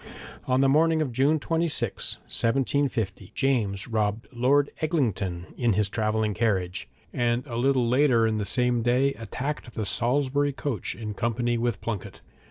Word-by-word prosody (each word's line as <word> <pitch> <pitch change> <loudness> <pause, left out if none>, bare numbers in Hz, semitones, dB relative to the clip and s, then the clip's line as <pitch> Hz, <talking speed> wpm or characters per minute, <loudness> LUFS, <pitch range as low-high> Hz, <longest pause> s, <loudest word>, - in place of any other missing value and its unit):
On 130 +1 +3
the 135 - +4
morning 160 +3 +3
of 150 -5 -1
June 140 +6 +2
26, 160 - 0
1750, 115 -6 -1
James 105 -8 0
robbed 110 -1 -1
Lord 135 +4 +2
Eglinton 105 - -1
in 120 -4 +1
his 105 +1 +1
travelling 110 0 0
carriage, 95 -5 -1 0.2
and 120 +1 0
a 120 -5 -6
little 125 0 +2
later 125 -2 +4
in 110 -1 0
the - - -1
same 125 +3 +1
day 125 +4 +2
attacked 130 +1 -5
the 110 - -2
Salisbury 135 +7 +1
coach, 130 -7 -3
in 105 -2 -5
company 120 +3 -1
with 115 -3 -1
Plunket. 105 -4 -5
120 Hz, 150 wpm, -26 LUFS, 110-135 Hz, 0.2 s, the